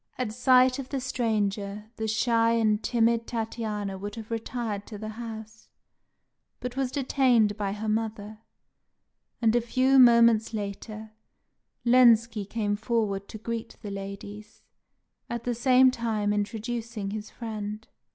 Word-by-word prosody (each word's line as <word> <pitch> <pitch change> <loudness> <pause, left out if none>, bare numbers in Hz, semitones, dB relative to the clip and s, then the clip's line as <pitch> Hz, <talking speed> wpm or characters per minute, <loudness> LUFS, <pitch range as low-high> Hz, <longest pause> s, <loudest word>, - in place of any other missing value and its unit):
At 245 -4 -2
sight 255 +1 +4
of 265 -1 -6
the 275 - -2
stranger, 215 -4 -2
the 220 - -2
shy 230 +1 +2
and 215 -2 +2
timid 230 -1 +1
Tatiana 215 -4 -3
would 205 +1 -6
have 225 -1 -9
retired 225 -2 -4
to 215 - -8
the 215 +1 -6
house, 220 -1 -8 0.9
but 250 0 -5
was 270 -1 0
detained 255 -6 +2
by 200 -2 -2
her 215 +1 -5
mother; 215 -1 -3 1.0
and 225 0 +4
a 240 - +3
few 260 +3 +3
moments 235 -2 +5
later, 215 +1 -6 0.7
Lenski 230 -3 +5
came 210 -3 -1
forward 210 -3 -1
to - - -8
greet 230 +1 -5
the 205 - -5
ladies, 205 +2 -8 0.7
at 235 -1 -4
the 245 - -1
same 255 +2 +5
time 220 -4 -1
introducing 220 0 -3
his 215 0 -6
friend. 215 -2 -6
225 Hz, 135 wpm, -27 LUFS, 210-235 Hz, 1.0 s, moments